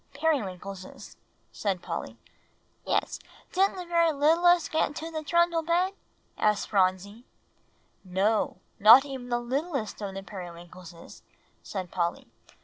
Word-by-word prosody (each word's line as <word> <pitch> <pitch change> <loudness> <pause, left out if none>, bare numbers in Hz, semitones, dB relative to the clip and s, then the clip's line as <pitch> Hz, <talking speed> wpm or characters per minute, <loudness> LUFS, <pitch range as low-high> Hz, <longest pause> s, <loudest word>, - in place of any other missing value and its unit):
"Periwinkleses," 195 - -3 0.4
said 190 -4 -2
Polly. - - -5 0.7
"Yes, - - 0 0.3
didn't 385 +2 +2
the 365 -1 -6
very 335 -1 +3
littlest 330 +3 +3
get 320 - +2
into 320 +3 -7
the 315 -1 -4
trundle 340 +1 +2
bed?" 350 +4 +1 0.5
asked 210 -1 +1
Phronsie. 195 +3 0 0.8
"No, 195 +4 0 0.2
not 230 +7 +9
even 265 -3 -7
the 240 - +1
littlest 255 - -3
of 195 -2 -5
the 195 - -6
Periwinkleses," 175 -2 -11 0.4
said 185 -3 -6
Polly. 170 -1 -2
240 Hz, 120 wpm, -27 LUFS, -, 0.8 s, not